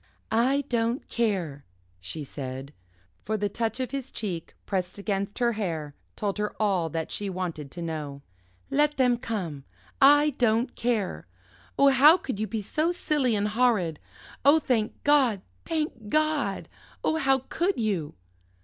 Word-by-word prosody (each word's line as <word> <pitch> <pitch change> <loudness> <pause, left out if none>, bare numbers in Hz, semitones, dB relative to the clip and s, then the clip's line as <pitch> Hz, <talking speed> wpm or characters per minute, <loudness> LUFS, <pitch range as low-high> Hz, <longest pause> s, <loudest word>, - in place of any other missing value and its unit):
"I 260 +5 +3
don't 235 +1 0
care," 185 -12 -1 0.4
she 95 - -5
said, 135 0 -7 0.5
for 215 +2 -1
the 205 0 -1
touch 225 +4 -2
of 255 -1 -2
his 270 -1 -4
cheek, 180 -10 -5
pressed 185 -2 -2
against 200 0 -2
her 240 -1 +2
hair, 165 -9 -3 0.2
told 205 -1 -2
her 210 0 -3
all 190 -6 +1
that 160 +1 -3
she 205 -1 -3
wanted 175 -6 -4
to 170 +4 -6
know. 150 -4 -5 0.5
"Let 295 +1 +2
them 250 -2 +4
come, 180 - -4 0.4
I 290 +2 +7
don't 230 0 +2
care! 230 -5 -1 0.5
Oh, 280 - +6
how 285 +6 +7
could 260 - -5
you 215 - -1
be 215 +1 -3
so 310 - 0
silly 295 -9 +1
and 205 0 0
horrid? 210 -9 +2 0.4
Oh, 285 +4 +7
thank 240 -8 -1
God, 260 -9 +3 0.2
thank 305 -10 -3
God! 305 -8 +1 0.4
Oh, 315 - +1
how 270 -3 +3
could 355 -2 0
you?" 195 -9 -1
215 Hz, 150 wpm, -27 LUFS, 180-265 Hz, 0.5 s, I